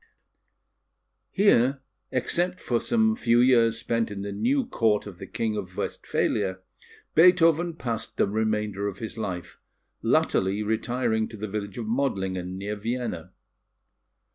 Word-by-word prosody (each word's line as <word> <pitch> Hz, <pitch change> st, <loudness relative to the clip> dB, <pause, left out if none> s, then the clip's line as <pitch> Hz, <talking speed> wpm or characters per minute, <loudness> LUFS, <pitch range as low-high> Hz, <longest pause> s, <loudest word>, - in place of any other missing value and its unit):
Here, 140 Hz, -, +3 dB, 0.3 s
except 175 Hz, +8 st, 0 dB
for 120 Hz, -2 st, 0 dB
some 220 Hz, -1 st, +2 dB
few 120 Hz, -, +3 dB
years 120 Hz, -2 st, +4 dB
spent 115 Hz, -1 st, -1 dB
in 100 Hz, -1 st, -5 dB
the 100 Hz, -, -4 dB
new 260 Hz, -, +1 dB
Court 110 Hz, -, +1 dB
of 95 Hz, -3 st, -10 dB
the -, -, -8 dB
King 110 Hz, -1 st, -2 dB
of 95 Hz, -3 st, -6 dB
Westphalia, 95 Hz, -3 st, -1 dB, 0.6 s
Beethoven 170 Hz, -1 st, +5 dB
passed 120 Hz, -7 st, -4 dB
the -, -, +3 dB
remainder 105 Hz, -1 st, -1 dB
of 100 Hz, -2 st, -5 dB
his 110 Hz, 0 st, -6 dB
life, 90 Hz, -5 st, -5 dB, 0.4 s
latterly 95 Hz, +3 st, +1 dB
retiring 110 Hz, +1 st, 0 dB
to 110 Hz, -, -10 dB
the 110 Hz, +1 st, -4 dB
village 100 Hz, -1 st, -5 dB
of 115 Hz, -, -4 dB
Modlingen, 95 Hz, -7 st, -2 dB
near 100 Hz, +2 st, -4 dB
Vienna. 110 Hz, -5 st, -4 dB
110 Hz, 135 wpm, -26 LUFS, 100-130 Hz, 0.6 s, Beethoven